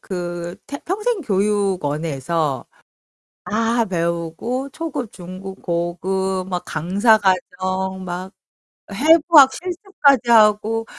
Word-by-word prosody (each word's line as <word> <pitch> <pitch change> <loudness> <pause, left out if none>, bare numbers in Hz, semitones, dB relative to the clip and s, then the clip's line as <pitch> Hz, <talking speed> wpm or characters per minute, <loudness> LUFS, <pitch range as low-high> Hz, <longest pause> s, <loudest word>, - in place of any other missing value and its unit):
그 175 -2 -5
테 280 - -6
평생교육원에서 185 - -1 0.8
다 230 +2 +1
배우고 170 +8 -3
초급, 275 -7 -5
중급, 185 +2 -9
고급, 185 +2 -2
막 180 -1 -3
강사 195 +8 +2
과정, 190 -1 -1
막 180 +1 -5 0.6
해부학 305 - +6
실습까지 340 - +1
하고 220 0 +4
190 Hz, 185 characters per minute, -20 LUFS, 175-240 Hz, 0.8 s, 해부학